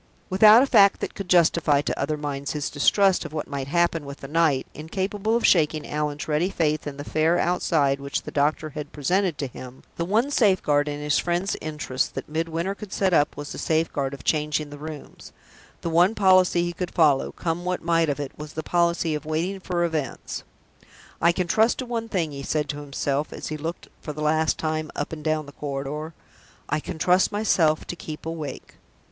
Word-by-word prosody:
Without 215 Hz, +5 st, +8 dB
a -, -, +3 dB
fact 200 Hz, -7 st, +5 dB
that -, -, -4 dB
could 195 Hz, -2 st, -7 dB
justify 170 Hz, -4 st, +4 dB
to -, -, -3 dB
other 150 Hz, +2 st, -1 dB
minds 140 Hz, -2 st, -4 dB
his 150 Hz, -2 st, -3 dB
distrust 190 Hz, +6 st, +3 dB
of 160 Hz, -2 st, -8 dB
what 155 Hz, -, -3 dB
might 140 Hz, -2 st, -4 dB
happen 170 Hz, +1 st, +1 dB
with 140 Hz, 0 st, -9 dB
the 135 Hz, -, -7 dB
night, 155 Hz, -3 st, +2 dB
incapable 195 Hz, +7 st, -2 dB
of 235 Hz, -, +1 dB
shaking 155 Hz, -3 st, +3 dB
Allan's 150 Hz, 0 st, -3 dB
ready 155 Hz, +4 st, +1 dB
faith 155 Hz, -5 st, 0 dB
in 140 Hz, -1 st, -6 dB
the 145 Hz, -, -5 dB
fair 160 Hz, +3 st, +2 dB
outside 155 Hz, -6 st, +1 dB
which 140 Hz, 0 st, -3 dB
the -, -, -7 dB
doctor 150 Hz, +2 st, 0 dB
had 150 Hz, +1 st, -7 dB
presented 175 Hz, +4 st, 0 dB
to 140 Hz, -, -2 dB
him, 130 Hz, 0 st, -10 dB
the 170 Hz, -, -1 dB
one 220 Hz, +10 st, +1 dB
safeguard 185 Hz, -, +3 dB
in 145 Hz, 0 st, -3 dB
his 150 Hz, 0 st, +1 dB
friend's 175 Hz, +3 st, -1 dB
interests 150 Hz, -4 st, -2 dB
that -, -, -7 dB
Midwinter 165 Hz, +4 st, -2 dB
could 200 Hz, -1 st, -10 dB
set 190 Hz, -2 st, +1 dB
up 145 Hz, -2 st, +2 dB
was 145 Hz, 0 st, -6 dB
the -, -, -6 dB
safeguard 150 Hz, -4 st, 0 dB
of -, -, -14 dB
changing 150 Hz, -1 st, 0 dB
the 145 Hz, -, -9 dB
rooms 155 Hz, -1 st, -9 dB, 0.5 s
the 170 Hz, -, -2 dB
one 175 Hz, +6 st, +4 dB
policy 185 Hz, -3 st, +4 dB
he 175 Hz, 0 st, -2 dB
could 180 Hz, +1 st, -4 dB
follow, 150 Hz, -5 st, +3 dB
come 170 Hz, +1 st, -3 dB
what 180 Hz, 0 st, -2 dB
might 165 Hz, -1 st, +2 dB
of 145 Hz, -, -1 dB
it, 140 Hz, -2 st, -4 dB
was 150 Hz, 0 st, -9 dB
the 160 Hz, -, -4 dB
policy 170 Hz, -1 st, +1 dB
of 150 Hz, -, -3 dB
waiting 165 Hz, +5 st, -2 dB
for 180 Hz, -2 st, -1 dB
events. 155 Hz, -7 st, -3 dB, 0.8 s
"I 170 Hz, -, +5 dB
can 180 Hz, +1 st, -1 dB
trust 220 Hz, +6 st, +3 dB
to 255 Hz, -, -4 dB
one 230 Hz, -2 st, -3 dB
thing," 170 Hz, -7 st, -1 dB
he 140 Hz, -1 st, -6 dB
said 150 Hz, +2 st, -1 dB
to 145 Hz, -, -3 dB
himself, 140 Hz, 0 st, -2 dB
as -, -, -6 dB
he 155 Hz, -, -3 dB
looked 165 Hz, +3 st, -5 dB
for 150 Hz, -, -6 dB
the 150 Hz, +1 st, -5 dB
last 155 Hz, +1 st, +2 dB
time 155 Hz, -1 st, -2 dB
up 145 Hz, -, -3 dB
and 155 Hz, -1 st, -7 dB
down 155 Hz, -1 st, 0 dB
the 145 Hz, -, -11 dB
corridor 145 Hz, +3 st, -5 dB, 0.5 s
"I 150 Hz, -, +1 dB
can 155 Hz, -, -7 dB
trust 180 Hz, +5 st, +3 dB
myself 180 Hz, -7 st, +2 dB
to -, -, -5 dB
keep 155 Hz, -2 st, -8 dB
awake." 160 Hz, -4 st, -6 dB
155 Hz, 210 wpm, -24 LUFS, 145-175 Hz, 0.8 s, Without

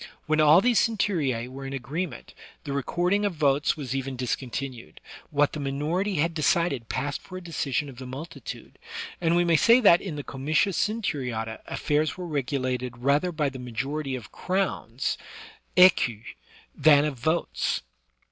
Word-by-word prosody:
When 155 Hz, 0 st, +2 dB
all 155 Hz, +4 st, +7 dB
these 245 Hz, 0 st, +3 dB
centurue 160 Hz, -, 0 dB
were 135 Hz, +1 st, -7 dB
in 135 Hz, -, -6 dB
agreement, 150 Hz, +7 st, -5 dB, 0.3 s
the 140 Hz, -, -4 dB
record 175 Hz, +7 st, 0 dB
ing 205 Hz, +1 st, +2 dB
of 200 Hz, -4 st, 0 dB
votes 145 Hz, -1 st, +2 dB
was 135 Hz, -3 st, -4 dB
even 135 Hz, 0 st, -3 dB
discontinued; 125 Hz, 0 st, -4 dB, 0.3 s
what 145 Hz, -2 st, +2 dB
the 155 Hz, -, -4 dB
minority 155 Hz, +8 st, -1 dB
had 165 Hz, +2 st, +1 dB
decided 155 Hz, -6 st, +1 dB
passed 140 Hz, +2 st, -2 dB
for 185 Hz, -, -9 dB
a 185 Hz, -, -9 dB
decision 150 Hz, -4 st, -2 dB
of 130 Hz, -3 st, -11 dB
the 130 Hz, 0 st, -8 dB
multitude; 150 Hz, +6 st, -8 dB, 0.4 s
and 170 Hz, 0 st, +2 dB
we 175 Hz, -, +4 dB
may 170 Hz, -1 st, +3 dB
say 235 Hz, +8 st, +6 dB
that 185 Hz, -7 st, +6 dB
in 180 Hz, -6 st, -5 dB
the 145 Hz, -, -5 dB
comitia 155 Hz, +9 st, 0 dB
centuriata 135 Hz, -, -2 dB
affairs 150 Hz, +2 st, 0 dB
were 180 Hz, -, -5 dB
regulated 130 Hz, -4 st, -2 dB
rather 140 Hz, +8 st, +2 dB
by 155 Hz, -3 st, 0 dB
the 135 Hz, -1 st, -9 dB
majority 135 Hz, +4 st, -3 dB
of 115 Hz, -4 st, -9 dB
crowns 190 Hz, +1 st, -2 dB, 0.6 s
{^cus) 130 Hz, -, +5 dB, 0.5 s
than 150 Hz, -2 st, +5 dB
of 140 Hz, -5 st, -3 dB
votes. 160 Hz, -, 0 dB
145 Hz, 160 wpm, -26 LUFS, 130-170 Hz, 0.6 s, all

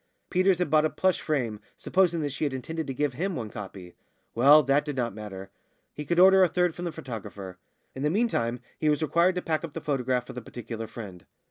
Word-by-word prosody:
Peters 185 Hz, 0 st, +3 dB
had 180 Hz, -4 st, -1 dB
bought 155 Hz, -1 st, +5 dB
a 155 Hz, -, +2 dB
plush 185 Hz, +2 st, +1 dB
frame, 120 Hz, -9 st, -1 dB, 0.2 s
supposing 175 Hz, -3 st, +1 dB
that 145 Hz, -1 st, -2 dB
she 140 Hz, -, -4 dB
had 145 Hz, -3 st, 0 dB
intended 160 Hz, +5 st, -4 dB
to 135 Hz, -, -3 dB
give 145 Hz, 0 st, 0 dB
him 180 Hz, +7 st, -2 dB
one 110 Hz, -4 st, -5 dB
copy; 95 Hz, -3 st, -9 dB, 0.4 s
well, 145 Hz, +6 st, +7 dB
that 140 Hz, +2 st, +2 dB
did 145 Hz, -2 st, -5 dB
not 120 Hz, -4 st, -1 dB
matter; 100 Hz, -3 st, -8 dB, 0.4 s
he 150 Hz, -, -6 dB
could 170 Hz, +4 st, -1 dB
order 190 Hz, +1 st, +7 dB
a 185 Hz, -, +6 dB
third 180 Hz, 0 st, +1 dB
from 175 Hz, -, -6 dB
the 170 Hz, -, -2 dB
photographer. 100 Hz, -, -8 dB, 0.3 s
In 130 Hz, -, -7 dB
the 150 Hz, -, +2 dB
meantime 150 Hz, -, 0 dB, 0.2 s
he 155 Hz, -, +2 dB
was 150 Hz, +1 st, +1 dB
required 170 Hz, +4 st, +3 dB
to 180 Hz, -, -3 dB
pack 155 Hz, 0 st, -1 dB
up 160 Hz, -3 st, -6 dB
the -, -, -2 dB
photograph 130 Hz, -3 st, -1 dB
for 130 Hz, -, -9 dB
the 125 Hz, -, -6 dB
particular 115 Hz, -1 st, -7 dB
friend. 100 Hz, -6 st, -9 dB
145 Hz, 230 wpm, -27 LUFS, 115-170 Hz, 0.4 s, well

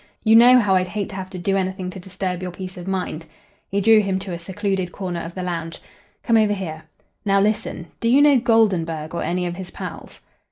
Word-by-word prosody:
"You 220 Hz, 0 st, +5 dB
know 245 Hz, +2 st, +8 dB
how 205 Hz, -6 st, +3 dB
I'd 185 Hz, -1 st, +2 dB
hate 205 Hz, +1 st, -3 dB
to 195 Hz, -, -8 dB
have 190 Hz, -1 st, -6 dB
to 190 Hz, -, -7 dB
do 195 Hz, +2 st, 0 dB
anything 185 Hz, -1 st, -2 dB
to 190 Hz, -, -9 dB
disturb 185 Hz, -1 st, -4 dB
your 185 Hz, -, -4 dB
peace 185 Hz, +1 st, -8 dB
of 180 Hz, 0 st, -9 dB
mind." 180 Hz, -4 st, -3 dB, 0.4 s
He 200 Hz, +1 st, 0 dB
drew 225 Hz, +2 st, +6 dB
him 195 Hz, -2 st, 0 dB
to 190 Hz, 0 st, -6 dB
a 170 Hz, -, -5 dB
secluded 190 Hz, 0 st, -2 dB
corner 180 Hz, -3 st, -4 dB
of 165 Hz, +1 st, -8 dB
the 185 Hz, -, -4 dB
lounge. 165 Hz, -2 st, -4 dB, 0.4 s
"Come 230 Hz, -3 st, +3 dB
over 215 Hz, -1 st, +3 dB
here. 160 Hz, -6 st, -6 dB, 0.4 s
Now, 195 Hz, -2 st, +3 dB
listen. 205 Hz, -4 st, -1 dB
Do 230 Hz, -, -1 dB
you 260 Hz, +4 st, +5 dB
know 290 Hz, -3 st, +6 dB
Goldenburg 180 Hz, -10 st, +1 dB
or 170 Hz, -, -2 dB
any 180 Hz, +1 st, -1 dB
of 175 Hz, 0 st, -4 dB
his 185 Hz, -2 st, -7 dB
pals?" -, -, -9 dB
190 Hz, 230 wpm, -22 LUFS, 180-205 Hz, 0.4 s, know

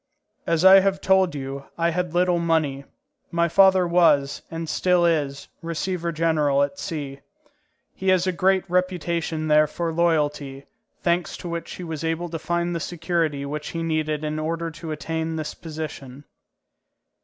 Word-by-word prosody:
As 165 Hz, +1 st, +2 dB
I 190 Hz, +1 st, +10 dB
have 195 Hz, 0 st, +1 dB
told 190 Hz, -4 st, +3 dB
you, 135 Hz, 0 st, -6 dB
I 170 Hz, 0 st, +1 dB
had 180 Hz, -1 st, -2 dB
little 180 Hz, -1 st, +3 dB
money. 155 Hz, -5 st, 0 dB, 0.4 s
My 170 Hz, 0 st, +1 dB
father 190 Hz, +1 st, +5 dB
was, 165 Hz, -5 st, +3 dB
and 165 Hz, 0 st, -5 dB
still 180 Hz, +2 st, +2 dB
is, 145 Hz, -5 st, 0 dB, 0.2 s
receveur 170 Hz, +1 st, -2 dB
général 155 Hz, -4 st, +2 dB
at 185 Hz, +6 st, -11 dB
C. 145 Hz, -7 st, -5 dB, 0.7 s
He 190 Hz, -, -2 dB
has 185 Hz, -1 st, +3 dB
a 185 Hz, -, +1 dB
great 190 Hz, +2 st, +1 dB
reputation 170 Hz, -3 st, -1 dB
there 150 Hz, 0 st, +5 dB
for 165 Hz, +2 st, -3 dB
loyalty, 150 Hz, -5 st, 0 dB, 0.4 s
thanks 175 Hz, 0 st, 0 dB
to -, -, -8 dB
which 170 Hz, 0 st, -5 dB
he 180 Hz, -, -8 dB
was 160 Hz, -2 st, -5 dB
able 165 Hz, +2 st, -2 dB
to 165 Hz, 0 st, -5 dB
find 170 Hz, +2 st, -1 dB
the -, -, -1 dB
security 165 Hz, -4 st, -2 dB
which 150 Hz, +1 st, -5 dB
he 165 Hz, 0 st, -4 dB
needed 155 Hz, -2 st, -1 dB
in 155 Hz, 0 st, -2 dB
order 165 Hz, +1 st, -2 dB
to 165 Hz, 0 st, -8 dB
attain 160 Hz, +1 st, -3 dB
this 155 Hz, -2 st, -4 dB
position. 150 Hz, -4 st, -8 dB
165 Hz, 160 wpm, -23 LUFS, 150-175 Hz, 0.7 s, I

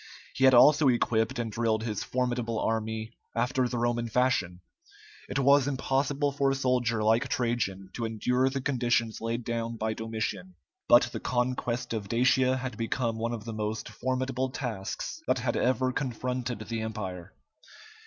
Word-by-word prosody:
He 135 Hz, -, +2 dB
had 130 Hz, -1 st, +7 dB
also 145 Hz, +4 st, +7 dB
equipped 115 Hz, -3 st, +1 dB
and 115 Hz, -2 st, -2 dB
drilled 110 Hz, 0 st, 0 dB
his 110 Hz, -3 st, -3 dB
formidable 125 Hz, -2 st, -1 dB
army 110 Hz, 0 st, -2 dB, 0.2 s
after 125 Hz, +2 st, +1 dB
the 120 Hz, -, -3 dB
Roman 120 Hz, 0 st, 0 dB
fashion. 110 Hz, -8 st, +1 dB, 0.7 s
It -, -, -2 dB
was 140 Hz, 0 st, +5 dB
impossible 140 Hz, +1 st, 0 dB
for 140 Hz, 0 st, +1 dB
a 135 Hz, -, +1 dB
soldier 125 Hz, -4 st, +1 dB
like 110 Hz, +2 st, +3 dB
Trajan 100 Hz, -6 st, -1 dB
to 120 Hz, -, -3 dB
endure 125 Hz, +4 st, +1 dB
the 135 Hz, 0 st, -3 dB
conditions 120 Hz, -4 st, 0 dB
laid 115 Hz, +1 st, -2 dB
down 115 Hz, 0 st, -3 dB
by 110 Hz, 0 st, -1 dB
Domitian; 105 Hz, -5 st, -4 dB, 0.3 s
but -, -, +8 dB
the -, -, -4 dB
conquest 125 Hz, -1 st, -1 dB
of 105 Hz, -3 st, -4 dB
Dacia 130 Hz, +2 st, +3 dB
had 130 Hz, 0 st, -5 dB
become 115 Hz, 0 st, -1 dB
one 115 Hz, +1 st, -1 dB
of 115 Hz, -2 st, -5 dB
the 115 Hz, -, -5 dB
most 110 Hz, 0 st, -3 dB
formidable 130 Hz, 0 st, -2 dB
tasks 120 Hz, -, -5 dB
that -, -, +2 dB
had 120 Hz, -1 st, -1 dB
ever 130 Hz, 0 st, +1 dB
confronted 125 Hz, -2 st, -3 dB
the 110 Hz, +1 st, -4 dB
Empire. 95 Hz, -5 st, -5 dB
120 Hz, 160 wpm, -28 LUFS, 110-130 Hz, 0.7 s, but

